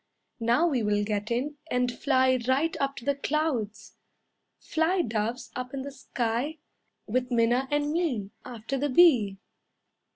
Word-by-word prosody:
"Now 240 +8 +3
we 275 -8 +1
will 205 -1 +1
get 205 0 -2
in, 270 +5 -2
and 250 0 +1
fly 260 -2 +2
right 280 +6 +2
up 275 -1 -1
to 240 - -9
the 280 - +2
clouds. 280 -7 -2 0.6
Fly, 340 +3 0
Doves, 225 +2 -3
up 250 +2 -5
in 265 - -4
the 280 - -6
sky, 250 +3 -2 0.5
With 250 +3 -1
Minna 240 +2 +2
and 290 0 0
me, 270 - -1
After 245 +1 -5
the 290 +2 0
bee." 250 - +5
255 Hz, 150 wpm, -27 LUFS, 230-290 Hz, 0.6 s, bee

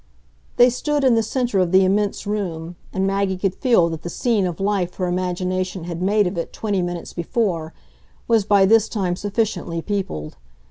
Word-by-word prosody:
They 245 +1 +7
stood 295 +3 -1
in 260 -2 +5
the 225 - +3
centre 235 -2 -1
of 180 -2 +1
the 190 0 +5
immense 200 +2 0
room, 175 -5 -3 0.2
and 190 0 -1
Maggie 195 -1 0
could 185 0 0
feel 230 -8 +3
that 165 -1 -5
the 175 - -5
scene 210 0 +1
of 175 - -5
life 195 -3 0
her 185 - -2
imagination 185 0 -2
had 170 0 -5
made 205 +2 +3
of 180 -1 -2
it 170 - -4
twenty 205 -4 -1
minutes 175 -1 -4
before 170 -3 -1 0.6
was 225 -3 +3
by 200 -1 +4
this 220 +2 +4
time 185 -5 -1
sufficiently 200 -4 -2
peopled. 165 - -4
190 Hz, 185 wpm, -21 LUFS, 175-210 Hz, 0.6 s, They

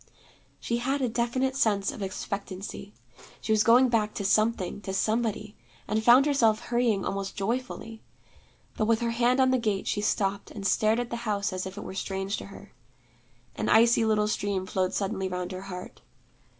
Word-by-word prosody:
She 235 - -2
had 265 +3 -1
a - - +2
definite 240 +3 -1
sense 205 -7 +1
of - - -9
expectancy. 195 +1 -6 0.4
She - - -4
was 215 -1 +4
going 245 +3 +6
back 215 -3 0
to 200 - -3
something, 215 -1 +1
to 190 -1 -4
somebody 215 0 -1 0.3
and 220 +1 0
found 245 +4 +7
herself 230 -7 +3
hurrying 235 -5 0
almost 195 0 -3
joyfully. 225 +1 -4 0.7
But 215 - 0
with 225 0 +2
her 235 0 0
hand 245 +2 +2
on 260 -1 +4
the 260 - +2
gate, 210 -4 -1
she 205 - -1
stopped, 200 -1 -1
and 200 -2 -8
stared 215 +4 +2
at 245 -1 -4
the 235 - -2
house 205 -4 -2
as 185 0 -3
if 190 +1 -9
it - - -6
were - - -7
strange 195 +1 -3
to - - -8
her. - - -13 0.8
An - - -2
icy 230 +1 +5
little 215 -1 +2
stream 200 -3 -1
flowed 185 -1 -1
suddenly 195 -1 -1
round 180 0 -4
her 185 0 -6
heart. 180 -2 -9
215 Hz, 185 wpm, -27 LUFS, 195-235 Hz, 0.8 s, found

